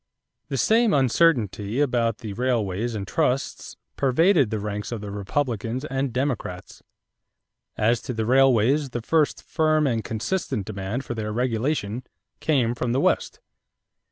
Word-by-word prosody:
= -, -, -55 dB
The 135 Hz, -, -2 dB
same 225 Hz, -, +3 dB
uncertainty 125 Hz, -, +2 dB
about 120 Hz, -6 st, +1 dB
the 105 Hz, -, -4 dB
railways 115 Hz, -2 st, -1 dB
and 100 Hz, -2 st, -4 dB
trusts 135 Hz, -2 st, -1 dB, 0.2 s
pervaded 145 Hz, -, +3 dB
the 110 Hz, -, -2 dB
ranks 105 Hz, 0 st, -4 dB
of 120 Hz, -, -3 dB
the 100 Hz, -1 st, -7 dB
Republicans 115 Hz, +4 st, -2 dB
and 135 Hz, -2 st, -2 dB
Democrats. 120 Hz, -8 st, -3 dB, 1.0 s
As 115 Hz, +2 st, +2 dB
to 125 Hz, -, -5 dB
the 110 Hz, 0 st, -1 dB
railways, 135 Hz, +2 st, +4 dB
the 120 Hz, -2 st, -5 dB
first 155 Hz, +3 st, +1 dB
firm 155 Hz, -1 st, +2 dB
and 115 Hz, -5 st, 0 dB
consistent 115 Hz, -, -2 dB
demand 105 Hz, +5 st, -4 dB
for -, -, -4 dB
their 110 Hz, -2 st, -4 dB
regulation 120 Hz, 0 st, -1 dB, 0.4 s
came 130 Hz, -7 st, +1 dB
from 120 Hz, 0 st, -2 dB
the 130 Hz, -, +2 dB
West. -, -, 0 dB
120 Hz, 145 wpm, -24 LUFS, 110-140 Hz, 1.0 s, railways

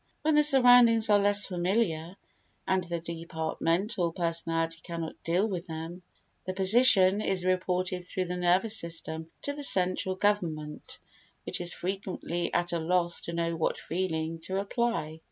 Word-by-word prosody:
When 315 Hz, +1 st, +2 dB
the 300 Hz, -, +5 dB
surroundings 245 Hz, -5 st, +5 dB
are 205 Hz, -, +5 dB
less 205 Hz, 0 st, +3 dB
familiar 180 Hz, -2 st, -2 dB, 0.5 s
and 190 Hz, -1 st, +1 dB
the 170 Hz, -1 st, -4 dB
departmental 170 Hz, +3 st, -2 dB
personality 165 Hz, -1 st, -1 dB
cannot 165 Hz, -2 st, -7 dB
deal 180 Hz, +6 st, 0 dB
with 185 Hz, -4 st, -5 dB
them, 165 Hz, +2 st, -7 dB, 0.4 s
the 185 Hz, -, -5 dB
position 195 Hz, -1 st, +6 dB
is 190 Hz, -3 st, -1 dB
reported 185 Hz, 0 st, -1 dB
through 185 Hz, +1 st, -4 dB
the 180 Hz, 0 st, -4 dB
nervous 180 Hz, +5 st, +2 dB
system 165 Hz, -3 st, -2 dB
to 285 Hz, -, -3 dB
the 290 Hz, -, -7 dB
central 185 Hz, -4 st, +2 dB
government 165 Hz, -7 st, -2 dB, 0.5 s
which -, -, -3 dB
is 175 Hz, 0 st, +2 dB
frequently 180 Hz, -2 st, -4 dB
at 175 Hz, 0 st, -1 dB
a 170 Hz, -, -1 dB
loss 170 Hz, +1 st, 0 dB
to 170 Hz, -, -6 dB
know 170 Hz, 0 st, -2 dB
what 165 Hz, -, -1 dB
feeling 165 Hz, -2 st, -3 dB
to 190 Hz, +4 st, -5 dB
apply. 200 Hz, -7 st, -3 dB
180 Hz, 150 wpm, -28 LUFS, 165-200 Hz, 0.5 s, position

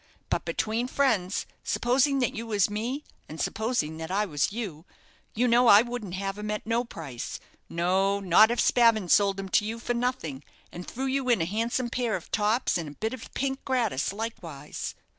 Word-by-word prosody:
But -, -, 0 dB
between 225 Hz, +3 st, -1 dB
friends, 225 Hz, -10 st, +1 dB, 0.2 s
supposing 270 Hz, +3 st, +2 dB
that 250 Hz, +1 st, +1 dB
you 230 Hz, -2 st, -5 dB
was 205 Hz, -2 st, +2 dB
me, 240 Hz, +8 st, -3 dB, 0.3 s
and 155 Hz, -, -8 dB
supposing 220 Hz, -9 st, -1 dB
that 160 Hz, 0 st, -6 dB
I 200 Hz, +3 st, +1 dB
was 150 Hz, -4 st, 0 dB
you, 200 Hz, -9 st, -5 dB, 0.5 s
you 245 Hz, +3 st, +2 dB
know, 240 Hz, +1 st, +5 dB
I 205 Hz, 0 st, +8 dB
wouldn't 240 Hz, -7 st, -5 dB
have 195 Hz, +1 st, -3 dB
him 210 Hz, 0 st, -4 dB
at 210 Hz, 0 st, -3 dB
no 230 Hz, +2 st, +1 dB
price 145 Hz, -, -7 dB, 0.3 s
no, 190 Hz, +4 st, +1 dB
not 200 Hz, +3 st, +6 dB
if 240 Hz, -, -1 dB
Spavin 225 Hz, -6 st, +4 dB
sold 200 Hz, +1 st, +4 dB
him 195 Hz, -, -4 dB
to 210 Hz, -, +3 dB
you 220 Hz, +2 st, -3 dB
for 240 Hz, +1 st, -2 dB
nothing, 235 Hz, -, -2 dB, 0.3 s
and 175 Hz, +1 st, -8 dB
threw 265 Hz, +3 st, -4 dB
you 265 Hz, -1 st, 0 dB
in 235 Hz, -, +4 dB
a 165 Hz, -, +1 dB
handsome 230 Hz, +5 st, -1 dB
pair 245 Hz, -3 st, 0 dB
of 175 Hz, -, -7 dB
tops 215 Hz, -2 st, +1 dB
and 160 Hz, -3 st, -5 dB
a 145 Hz, -, -14 dB
bit 220 Hz, +2 st, -1 dB
of 260 Hz, -, -9 dB
pink 270 Hz, 0 st, -2 dB
gratis 235 Hz, -, 0 dB
likewise." 195 Hz, -9 st, -6 dB
220 Hz, 195 wpm, -27 LUFS, 185-240 Hz, 0.5 s, I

